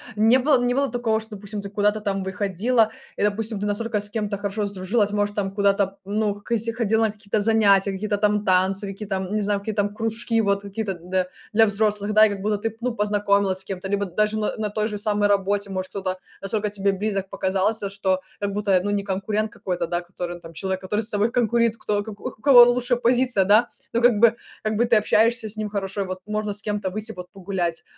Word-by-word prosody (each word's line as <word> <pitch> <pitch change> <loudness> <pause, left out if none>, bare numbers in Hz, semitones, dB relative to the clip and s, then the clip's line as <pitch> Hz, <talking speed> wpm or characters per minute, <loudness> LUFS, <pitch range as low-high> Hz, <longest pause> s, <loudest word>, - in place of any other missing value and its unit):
не 225 +4 +5
было 260 -2 +3
не 245 - +1
было 275 +1 +1
такого, 230 -2 0
что, 220 -1 -9
допустим, 205 +1 -6
ты 200 - -7
куда-то 210 +1 +1
там 195 -2 -2
выходила 205 +4 +1 0.3
и, - - -4
допустим, 210 +1 0
ты 205 - -2
настолько 210 +1 -1
с 205 - 0
кем-то 210 -1 -2
хорошо 205 +1 -2
сдружилась? 200 +2 0
Может, 205 0 -1
там 195 -2 -1
куда-то, 200 -1 +1
ну, 210 +1 0
к 205 +3 -15
если 230 0 +1
ходила 225 -1 +1
на 220 - 0
какие-то 210 0 -2
занятия, 205 -2 +4
какие-то 205 +2 -2
там 210 0 +1
танцы, 190 +2 +2
какие-то, 195 0 -4
м, 190 +2 -4
не 215 - +1
знаю, 205 0 0
какие-то, 205 0 -1
м, 205 - -1
кружки, 225 +1 -1
вот 200 -1 0
какие-то, 200 0 -4
д 180 +2 -2 0.3
для 220 +1 +5
взрослых, 210 0 +1
да. 215 +1 +7
И - - +2
как 200 -1 -5
будто 210 +1 0
ты, 225 +2 -4
ну, 245 -1 -2
познакомилась 200 -2 +1
с - - -3
кем-то, 190 0 -5
либо 200 0 0
даже 210 +4 0
на 210 - -1
на 215 -2 -2
той 215 0 -1
же 210 -2 -4
самой 205 0 +1
работе. 200 0 +1
Может, 185 -1 -4
кто-то 190 -1 -3 0.2
настолько 210 +1 -1
тебе 200 -1 0
близок 195 -1 -2 0.2
показался, 195 +2 +1
что, 190 -1 -1 0.2
как 200 -1 -2
будто, 200 -2 +2
ну, 205 - -2
не 205 -1 0
конкурент 205 +2 -2
какой-то, 180 -2 -3
да, 175 +1 -1
который 175 0 -6
он 175 - -13
там 165 0 -11
человек, 190 +3 -3
который 210 +3 -1
с 220 - 0
тобой 210 +1 +1
конкурит, 235 -1 +2
кто 205 -2 -1
у - - -2
к - - -20
у - - -6 0.2
к - - -22
кого 265 -4 +9
лучше 245 0 +2
позиция, 245 -3 +2
да. 215 +5 +5 0.2
Ну 235 - 0
как 240 -3 +5
бы, 235 +1 +5 0.3
как 215 0 -1
бы 240 - +3
ты 235 -1 +3
общаешься 220 +1 +2
с 210 - -8
ним 215 -1 -2
хорошо, 200 -1 -3
и - - -6
вот 185 0 -5
можно 210 0 -2
с 205 - -5
кем-то 205 -2 -2
выйти 215 +3 -4
вот, 180 -1 -9
погулять. 180 -3 -3
205 Hz, 235 wpm, -23 LUFS, 195-220 Hz, 0.3 s, кого